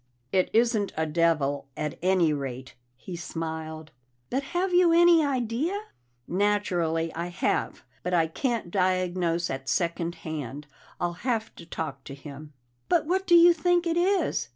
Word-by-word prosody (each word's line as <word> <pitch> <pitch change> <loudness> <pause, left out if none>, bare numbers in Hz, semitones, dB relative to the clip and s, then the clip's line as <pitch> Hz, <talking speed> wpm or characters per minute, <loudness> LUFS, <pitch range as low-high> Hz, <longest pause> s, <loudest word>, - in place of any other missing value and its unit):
"It 185 -1 +2
isn't 225 -3 +2
a 160 - +1
devil, 150 -3 +1
at 150 - -4
any 180 -3 +3
rate," 130 -2 -5 0.2
he 175 +8 -8
smiled. 160 -2 -6 0.4
"But 265 - +1 0.2
have 370 0 0
you 355 -1 +5
any 340 -1 +6
idea?" 275 - -1 0.5
"Naturally 175 -5 0
I 170 +1 -3
have, 175 +1 -1 0.2
but 180 - -3
I 170 -2 +3
can't 225 - -2
diagnose 180 -2 0
at 135 0 -5
second 170 0 -1
hand. 150 -2 -5 0.3
I'll 175 -1 -1
have 230 -4 -1
to 170 - -13
talk 140 -5 -5
to 135 - -8
him." 145 +1 -10 0.4
"But 335 - +3
what 375 +4 0
do 345 - +6
you 340 0 +8
think 350 +1 +1
it 335 -1 0
is?" 355 - +1
175 Hz, 155 wpm, -27 LUFS, 160-255 Hz, 0.5 s, you